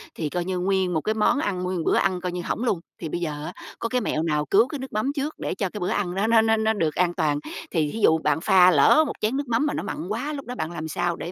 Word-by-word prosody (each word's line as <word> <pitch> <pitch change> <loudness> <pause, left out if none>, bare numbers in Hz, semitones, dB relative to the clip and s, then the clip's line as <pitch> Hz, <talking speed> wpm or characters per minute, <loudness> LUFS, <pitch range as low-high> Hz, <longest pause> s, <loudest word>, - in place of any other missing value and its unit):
thì 155 - -3
coi 175 +3 -2
như 185 0 -2
nguyên 190 0 +1
một 160 - 0
cái 215 - 0
món 220 +6 +2
ăn, 185 -9 -2
nguyên 180 0 -2
một 165 - -2
bữa - - +3
ăn 185 -2 +1
coi 180 0 -2
như 180 0 -4
hỏng 220 - -3
luôn, 210 -8 +1 0.2
thì 165 - -4
bây 175 - -3
giờ 150 -3 -4
á - - -6 0.3
có 230 - -2
cái 250 0 0
mẹo 160 -7 -1
nào 150 -2 0
cứu 215 +9 +4
cái 285 +1 -6
nước 265 0 -8
mắm 215 +6 0
trước 290 +2 -2
để - - -3
cho 195 -1 -2
cái 210 - -7
bữa 180 - -1
ăn 200 -5 -1
nó 200 +3 +1
nó 225 0 +5
nó 220 0 +2
nó 220 0 +2
được 160 -7 -1
an 175 -1 +2
toàn? 150 -4 0 0.3
Thì 155 -4 0
thí 225 - -5
dụ 160 - +6
bạn 150 -1 0
pha 185 -1 +6
lỡ 170 - +6
một - - -3
chén 220 +5 0
nước 285 -1 -3
mắm 240 +4 +1
mà 300 - 0
nó - - -3
mặn - - -4
quá, 230 +8 -3
lúc 275 -2 -6
đó 250 - -6
bạn 160 -7 -3
làm 160 -2 -5
sao 170 +2 -1
để 170 - -6
185 Hz, 325 wpm, -24 LUFS, 165-225 Hz, 0.3 s, dụ